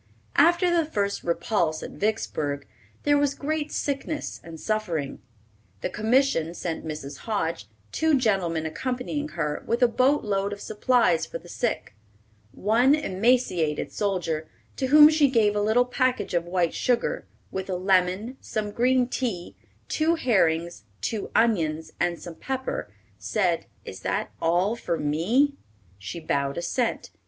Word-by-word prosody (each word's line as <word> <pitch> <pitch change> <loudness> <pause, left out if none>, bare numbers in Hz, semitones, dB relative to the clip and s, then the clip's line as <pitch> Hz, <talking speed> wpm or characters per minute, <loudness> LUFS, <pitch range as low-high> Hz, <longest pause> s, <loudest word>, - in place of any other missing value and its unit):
After 345 +4 +5
the 335 - +3
first 205 -10 -2
repulse 170 -1 0
at - - -6
Vicksburg, 150 -10 -2 0.4
there 290 0 +4
was 285 -1 +1
great 300 +1 -2
sickness 290 +2 -3
and 165 -1 -9
suffering. 175 -9 -2 0.6
The - - -2
Commission 220 - +2
sent 165 -2 -4
Mrs. 150 -3 -6
Hoge, 170 - -2 0.2
two 315 -2 +3
gentlemen 185 -9 +1
accompanying 255 - -3
her, 150 0 -2
with 235 +2 +1
a - - +7
boat 260 +5 +2
load 200 -1 -1
of 200 - -8
supplies 215 -5 +2
for - - -5
the - - -16
sick. - - -2 0.6
One 240 - +3
emaciated 190 - +1
soldier, 175 -6 -1 0.3
to 265 - 0
whom 300 +2 +9
she 305 -2 +4
gave 215 -5 +3
a 205 - +1
little 220 +4 +3
package 255 -2 0
of 170 -1 +1
white 175 -2 +1
sugar, 250 - 0 0.2
with 190 0 -4
a 185 - 0
lemon, 190 +6 +1
some 210 -1 -3
green 250 +3 +2
tea, 230 -9 -3 0.3
two 320 +2 +2
herrings, 170 - +1 0.2
two 220 -3 -2
onions, 160 -8 +1
and 175 -1 0
some 175 - -8
pepper, 265 0 -4 0.3
said, 180 -6 0 0.2
"Is - - -8
that - - -2
all 175 +6 +2
for 175 -7 -2
me?" 215 - +1 0.4
She 95 - -6
bowed 140 -3 -1
assent. 230 +7 -1
210 Hz, 145 wpm, -26 LUFS, 170-255 Hz, 0.6 s, whom